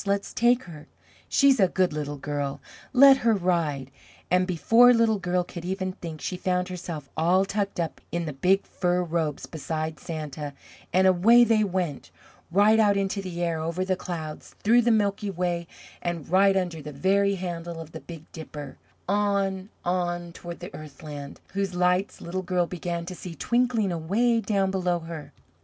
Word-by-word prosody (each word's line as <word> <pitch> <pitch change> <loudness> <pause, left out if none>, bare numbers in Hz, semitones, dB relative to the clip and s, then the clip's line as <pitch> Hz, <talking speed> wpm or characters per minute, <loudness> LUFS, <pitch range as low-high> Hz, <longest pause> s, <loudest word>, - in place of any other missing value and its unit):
let's 200 0 -1
take 240 +2 +3
her! 155 -4 -11 0.4
She's 275 -3 +4
a 190 - +6
good 180 -2 +1
Little 145 -1 -4
Girl! 145 -1 -3 0.3
Let 270 +1 +8
her 230 -4 +2
ride!" 165 -8 -1 0.4
And 180 0 +3
before 230 +8 +5
Little 225 -2 +3
Girl 180 -1 0
could 175 -1 -9
even 185 +1 -2
think, 165 -4 -8
she 180 - -3
found 180 0 -1
herself 170 -5 -6
all 180 +4 +3
tucked 200 -1 -2
up 165 -2 -3
in 170 +1 -2
the 150 - -4
big 185 +8 +2
fur 180 0 0
robes 160 -3 -2
beside 155 -1 -4
Santa, 150 -2 -6 0.4
and 185 +1 +4
away 200 +7 +6
they 225 -2 +3
went, 180 -7 -2 0.4
right 205 +5 +5
out 205 -2 +4
into 195 0 -1
the 175 -2 -4
air, 165 -2 0
over 170 +3 -2
the 190 0 +1
clouds, 160 -4 -7
through 235 +3 +5
the 240 - +2
Milky 205 -2 +1
Way, 175 -2 -2 0.3
and 170 -4 -3
right 195 +2 +4
under 175 -4 -2
the 150 - -7
very 200 +7 +2
handle 170 -2 -5
of 160 -1 -9
the 160 - -8
Big 165 -3 -10
Dipper, 150 -3 -8 0.3
on, 200 -1 0 0.2
on, 175 -1 -1
toward 170 +1 -9
the 180 +3 -7
Earthland, 145 -1 -9 0.2
whose 195 -2 -2
lights 180 +2 +1
Little 185 +2 -3
Girl 180 -1 0
began 170 -1 -4
to 185 - -6
see 175 -1 -8
twinkling 235 - +1
away 210 +9 +1
down 195 -3 +1
below 180 -2 0
her. 165 -2 -8
180 Hz, 175 wpm, -26 LUFS, 165-200 Hz, 0.4 s, Let